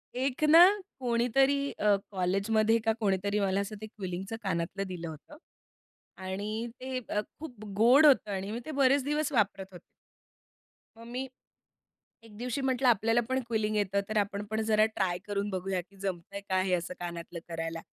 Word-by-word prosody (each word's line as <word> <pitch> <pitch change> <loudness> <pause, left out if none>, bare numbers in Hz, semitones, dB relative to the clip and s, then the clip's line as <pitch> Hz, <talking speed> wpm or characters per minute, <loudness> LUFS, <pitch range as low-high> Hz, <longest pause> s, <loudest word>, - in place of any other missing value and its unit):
एक 265 +3 -1
ना 330 +2 +9 0.4
कोणीतरी 265 +3 +2
अ, 210 -1 +4 0.2
कॉलेजमध्ये 205 +4 +2
का 225 - +3
कोणीतरी 200 0 0
मला 195 0 +1
असं 205 +2 -5
ते - - -5
क्विलिंगचं 195 0 -5
कानातलं 185 +1 -2
दिलं 175 -2 -6
होतं. 160 - -11 0.8
आणि 205 +5 -4
ते 260 0 -3
अ, 210 - 0 0.2
खूप 245 -9 -9
गोड 255 +8 +6
होतं 255 -7 +5
आणि 195 +1 -3
मी 235 - -3
ते 310 - -5
बरेच 270 0 +4
दिवस 295 +1 -1
वापरत 200 -5 +1
होते. 175 - -11 1.2
मग 230 - -12
मी 255 +2 -4 1.0
एक 210 -2 -15
दिवशी 250 +3 -3
म्हटलं 260 -1 +1
आपल्याला 225 +1 +3
पण 260 0 +1
क्विलिंग 215 -2 0
येतं. 200 -1 +1
तर 215 - -3
आपण 200 0 -1
पण 220 0 -1
जरा 215 0 +4
ट्राय 180 -3 0
करून 205 0 -2
बघूया 185 -1 -2
की 195 +3 -17
जमतंय 195 +1 -4
का 185 0 +2
हे 185 -1 -1
असं 175 +1 -3
कानातलं 170 0 -6
करायला. 165 0 -4
210 Hz, 165 wpm, -30 LUFS, 190-245 Hz, 1.2 s, ना